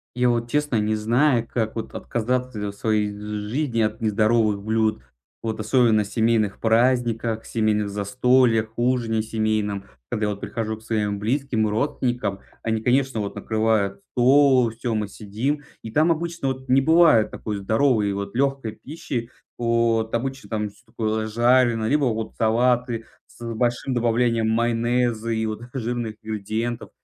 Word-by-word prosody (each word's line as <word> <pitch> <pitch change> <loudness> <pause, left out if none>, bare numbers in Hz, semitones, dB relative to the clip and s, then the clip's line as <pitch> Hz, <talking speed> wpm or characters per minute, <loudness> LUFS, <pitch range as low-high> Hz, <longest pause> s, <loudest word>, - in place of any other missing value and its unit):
Я 125 0 +3
вот, 120 0 0
честно, 145 -4 0
не 110 +1 +1
знаю, 120 +2 +2
как 110 -3 -1
вот 110 -1 -5
отказаться 125 0 -2
в - - -17
своей 105 0 0
жизни 105 +5 -2
от 110 +1 -1
нездоровых 110 -1 +2
блюд. 110 -7 0 0.4
Вот 110 -1 -3
особенно 110 -1 +3
в - - -9
семейных 110 -2 +1
праздниках, 115 -1 +1
семейных 105 -2 0
застольях, 110 +2 +2
ужине 120 -2 +1
семейном. 110 -2 -1 0.2
Когда 105 - -1
я - - 0
вот 100 - -7
прихожу 110 +1 -3
к - - -17
своим 105 -2 -1
близким, 115 0 0
родственникам, 110 -3 -1 0.2
они, 110 -1 -1
конечно, 130 0 +1
вот 100 -1 -4
накрывают 105 -2 0
стол. 130 -1 +5
Всё, 115 +1 -3
мы 105 -1 -1
сидим, 110 +9 -3 0.2
и 110 - -7
там 155 +7 +3
обычно 170 -2 -2
вот 130 0 -5
не 130 +2 +5
бывает 160 -7 +5
такой 105 -2 -5
здоровой, 110 +1 +2
вот 100 +1 -5
лёгкой 135 -4 -1
пищи. 130 -5 -5 0.3
Вот 115 -1 +1
обычно 130 -2 -4
там 105 -1 -2
всё 105 - -23
такое 110 -1 -2
жареное, 120 0 +3
либо 145 0 +2
вот 110 -2 -2
салаты 120 0 +1 0.2
с 120 - -12
большим 120 +3 -1
добавлением 115 -1 +1
майонеза 120 0 +1
и 110 0 0
вот 110 0 -4
жирных 120 -3 -3
ингредиентов 110 +2 -3
115 Hz, 150 wpm, -23 LUFS, 110-125 Hz, 0.4 s, стол